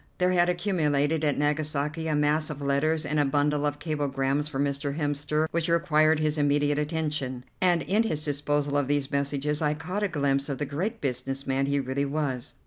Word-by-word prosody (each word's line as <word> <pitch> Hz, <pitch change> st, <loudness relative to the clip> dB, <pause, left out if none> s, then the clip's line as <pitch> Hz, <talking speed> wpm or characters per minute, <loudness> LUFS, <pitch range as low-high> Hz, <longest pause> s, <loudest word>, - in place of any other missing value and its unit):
There 180 Hz, 0 st, +2 dB
had 175 Hz, -1 st, +3 dB
accumulated 160 Hz, -5 st, +1 dB
at 145 Hz, -2 st, +1 dB
Nagasaki 150 Hz, +1 st, -1 dB
a 155 Hz, -, +1 dB
mass 150 Hz, +1 st, +1 dB
of 150 Hz, -2 st, -6 dB
letters 145 Hz, +3 st, +1 dB
and 150 Hz, +1 st, 0 dB
a -, -, +4 dB
bundle 145 Hz, +1 st, +1 dB
of 145 Hz, 0 st, -2 dB
cablegrams 145 Hz, -2 st, -1 dB
for 145 Hz, -3 st, -5 dB
Mr. 140 Hz, +1 st, -1 dB
Hemster 150 Hz, +1 st, 0 dB
which 170 Hz, 0 st, -1 dB
required 160 Hz, -2 st, +3 dB
his 155 Hz, 0 st, 0 dB
immediate 145 Hz, 0 st, +2 dB
attention, 150 Hz, -5 st, -2 dB, 0.2 s
and 180 Hz, -2 st, +3 dB
in 210 Hz, +4 st, +2 dB
his 155 Hz, -10 st, 0 dB
disposal 145 Hz, 0 st, 0 dB
of 145 Hz, -2 st, +1 dB
these 145 Hz, -1 st, 0 dB
messages 140 Hz, +2 st, -1 dB
I 150 Hz, -1 st, +1 dB
caught 180 Hz, +7 st, -4 dB
a 205 Hz, -, +2 dB
glimpse 140 Hz, -4 st, 0 dB
of 140 Hz, -, -2 dB
the 150 Hz, -, -2 dB
great 185 Hz, -, -3 dB
business 135 Hz, 0 st, -2 dB
man 135 Hz, +1 st, 0 dB
he 140 Hz, 0 st, +1 dB
really 135 Hz, +1 st, -1 dB
was. 140 Hz, -4 st, -2 dB
150 Hz, 195 wpm, -27 LUFS, 140-155 Hz, 0.2 s, a